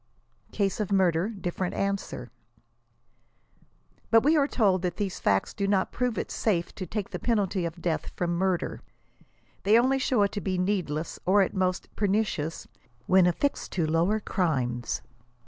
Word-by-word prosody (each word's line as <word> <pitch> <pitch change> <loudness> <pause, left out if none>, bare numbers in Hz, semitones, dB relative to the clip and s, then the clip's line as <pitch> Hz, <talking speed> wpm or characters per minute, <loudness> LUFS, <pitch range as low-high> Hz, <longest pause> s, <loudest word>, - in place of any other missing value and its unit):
"CASE 200 0 0
OF 210 -2 -2
MURDER 185 -1 +2
DIFFERENT." 185 -3 -3
ANSWER. 195 - -3 1.8
But 225 0 +5
we 305 +4 +4
are 285 -2 +3
told 195 -9 +2
that 180 -2 -2
these 200 -3 -3
facts 95 -1 +1
do 200 - -1
not 195 -2 +1
prove 250 -2 -1
it - - -3
safe 175 -6 0
to 185 - -6
take 205 +2 -4
the 180 - -4
penalty 200 -5 0
of 170 +1 -6
death 165 -3 -1
from 175 -1 -1
mvrder. 185 -2 0 0.8
They 210 +3 +5
only 260 +3 +3
show 250 -5 +2
it 200 - +1
to 205 - -4
be 185 -2 -1
needless, 180 -5 -1
or, 195 +3 +4
at - - -3
most, 185 -1 -1
pernicious, 195 -6 -1 0.4
when 185 -1 +5
affixed 280 +11 -1
to 170 -4 +1
lower 170 +7 +2
crimes. 130 - -1
190 Hz, 160 wpm, -27 LUFS, 175-210 Hz, 1.8 s, But